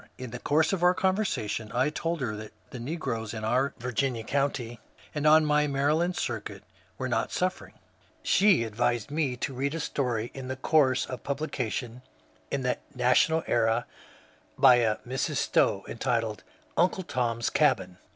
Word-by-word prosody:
In 130 -2 -7
the 125 - -6
course 155 +7 +2
of 190 - -1
our 180 +1 +5
conversation 185 - -1
I 130 +5 +2
told 165 0 -2
her 115 -4 -2
that 110 0 -9 0.2
the 125 - -7
negroes 120 -5 -4
in 110 - -5
our 125 +5 +1
Virginia 120 0 -1
county, 130 -3 -1 0.3
and 150 0 0
on 155 0 +6
my 150 0 +3
Maryland 150 +6 +1
circuit, 105 -4 -4 0.3
were 130 - -2
not 120 -3 -1
suffering. 185 +1 -2 0.5
She 195 - +4
advised 120 +2 -1
me 145 -5 -1
to 135 +3 -3
read 140 +4 -2
a - - -3
story 120 -6 -2
in 130 -1 -5
course 130 -1 +2
of 125 -2 -7
publication 125 -4 -3 0.5
in 140 -2 -2
the 125 0 0
^ - - -29
National 130 +6 +3
Era 115 0 +1 0.4
" - - -28 0.3
by 125 - +7
a 110 -3 +2
Mrs. 130 +1 -1
Stowe, - - +2
entitled 115 -3 -1 0.4
*^ - - +5
Uncle 185 +1 +1
Tom's 120 -6 -1
Cabin." 95 -12 +1
130 Hz, 165 wpm, -28 LUFS, 115-150 Hz, 0.5 s, by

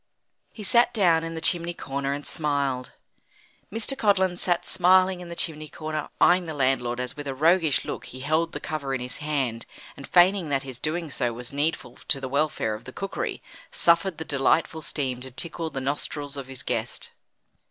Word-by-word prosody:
He 215 - -9
sat 235 +4 +4
down 170 -6 +4
in 165 0 -4
the - - -3
chimney 175 0 +2
corner 140 -1 -3
and 145 +1 -4
smiled. 140 -4 -1 0.8
Mr. 225 +5 0
Codlin 190 -6 +2
sat 175 -1 0
smiling 185 +1 +4
in 175 -1 -9
the 170 - -6
chimney 155 -2 -1
corner, 155 -1 -4
eyeing 180 0 +5
the 160 - -4
landlord 125 -3 +1
as 125 0 -3
with 145 -1 -7
a 135 - -3
roguish 160 +1 +3
look - - -5
he 130 - -9
held 160 +4 +1
the 150 - -5
cover 140 -3 -3
in - - -2
his 125 +1 -3
hand, 135 -6 -2 0.3
and 140 - -10
feigning 180 -1 +4
that 135 -1 0
his 130 -3 -6
doing 160 0 -2
so 120 -3 0
was 120 +3 -7
needful 145 -4 -1
to 135 - +3
the 135 - -4
welfare 140 -4 0
of 105 - -8
the 130 - -8
cookery, 195 +7 -4 0.3
suffered 170 +1 +3
the 160 - -5
delightful 155 +3 +1
steam 130 -5 -2
to 130 - -6
tickle 165 +5 -1
the 135 - -4
nostrils 145 +1 -2
of 135 -2 -6
his 130 -2 -7
guest. - - -3
150 Hz, 195 wpm, -26 LUFS, 135-170 Hz, 0.8 s, eyeing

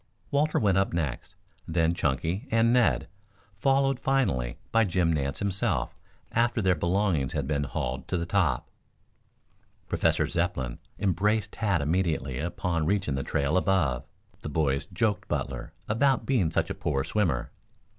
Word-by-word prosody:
Walter 150 +2 +2
went 95 -3 +3
up 95 - 0
next, 75 -8 -3 0.3
then 80 0 +2
Chunky 80 - -1
and 115 +1 +3
Ned, 115 -10 +3 0.5
followed 135 +2 +2
finally 115 - 0
by 115 0 +4
Jim 90 -4 +1
Nance 70 -2 -1
himself 95 -11 -1 0.4
after 120 0 +2
their 95 -3 +3
belongings 85 -4 0
had 75 -4 -1
been 70 0 0
hauled 65 -1 -3
to 90 - -1
the 85 - -2
top. 85 -10 +1 1.2
Professor - - +2
Zepplin 85 -9 -2 0.2
embraced 105 +2 +1
Tad 100 -9 0
immediately 80 -6 0
upon 85 0 -1
reaching 95 -5 +1
the 65 - -1
trail 70 +4 0
above. 90 -10 +1 0.4
The - - -5
boys 70 -2 0
joked 105 -3 -1
Butler - - -3 0.2
about 130 +5 +2
being 115 -12 +2
such - - 0
a - - 0
poor 70 -4 -1
swimmer. 85 - 0
85 Hz, 145 wpm, -27 LUFS, 70-105 Hz, 1.2 s, by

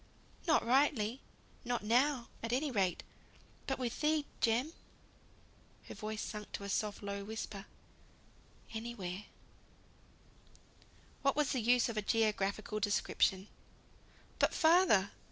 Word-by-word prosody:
"Not 315 - +4
rightly 250 -2 +2 0.4
not 245 -3 -2
now, 245 +3 +2
at 230 - -3
any 275 +4 0
rate; 190 -6 0 0.6
but 270 - 0
with 245 -2 -3
thee, 305 -1 +2
Jem," 245 +8 +1 1.1
her - - -9
voice 215 0 -4
sunk 210 -1 -6
to - - -4
a 200 - -5
soft, 210 0 -2
low 200 0 -4
whisper, 205 -1 -6 1.1
"anywhere 210 -4 -5 1.0
" - - -28
What 275 0 +2
was 300 -2 +1
the 255 - 0
use 245 +2 +4
of 230 -2 -4
a - - +2
geographical 215 0 0
description? 200 -2 +1 0.9
"But - - +3
father!" 320 - +5
225 Hz, 120 wpm, -34 LUFS, 205-260 Hz, 1.1 s, father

